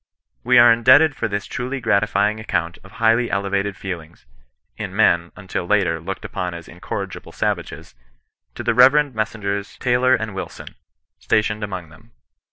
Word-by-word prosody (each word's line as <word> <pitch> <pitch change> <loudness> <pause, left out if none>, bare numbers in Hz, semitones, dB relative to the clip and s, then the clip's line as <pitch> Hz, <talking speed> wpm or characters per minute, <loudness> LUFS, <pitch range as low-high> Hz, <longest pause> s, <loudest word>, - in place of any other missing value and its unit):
We 125 +1 +4
are 120 -1 +8
indebted 130 +6 +5
for - - -2
this 100 -1 -3
truly 130 +2 -4
gratifying 105 -1 +1
account 85 -5 -3
of 95 +2 -16
highly 115 0 +2
elevated 100 0 -1
feelings 85 -5 -8 0.5
(in - - -6
men, 85 0 +3
until 95 -3 -5
lately, 95 -5 +1
looked 95 +4 -6
upon 90 -1 -4
as 85 -1 -10
incorrigible 95 +2 -7
savages), - - -3 0.6
to - - -6
the - - +1
Rev. 135 +4 +5
Messrs. 100 -2 -3
Taylor 125 +1 +2
and 110 -3 -4
Wilson, 95 - -7 0.5
stationed 105 0 0
among 95 -5 -6
them. 110 +9 -19
105 Hz, 150 wpm, -21 LUFS, 95-120 Hz, 0.6 s, are